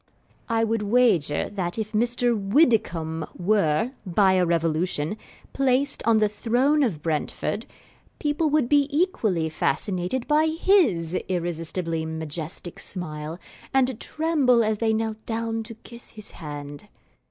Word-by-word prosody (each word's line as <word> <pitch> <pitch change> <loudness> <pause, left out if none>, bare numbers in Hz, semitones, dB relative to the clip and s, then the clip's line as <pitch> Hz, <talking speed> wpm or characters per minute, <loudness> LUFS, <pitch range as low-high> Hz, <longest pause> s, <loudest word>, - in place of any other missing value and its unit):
I 225 0 +2
would 225 -1 0
wager 205 -9 +2
that 185 -3 -3
if 215 -1 -3
Mr. 240 +2 +2
Widdicomb 195 - +1
were, 200 +2 +2
by 190 0 +3
a 185 -1 +3
revolution, 165 0 0 0.4
placed 275 +1 +1
on 230 -1 +5
the 215 -1 +4
throne 245 +8 +1
of 185 - 0
Brentford, 155 -3 -2 0.5
people 300 +1 0
would 295 -4 +2
be 285 +1 +4
equally 235 - +1
fascinated 180 - -1
by 305 +1 +3
his 315 - +2 0.2
irresistibly 165 -1 -2
majestic 160 +2 -5
smile 155 -3 -5 0.4
and 260 -3 +2
tremble 290 -7 +2
as 215 -1 0
they 225 -1 +2
knelt 220 0 -2
down 225 0 -2
to 230 0 -9
kiss 235 +1 -10
his 215 -2 -8
hand. 145 +2 -8
215 Hz, 130 wpm, -25 LUFS, 165-245 Hz, 0.5 s, on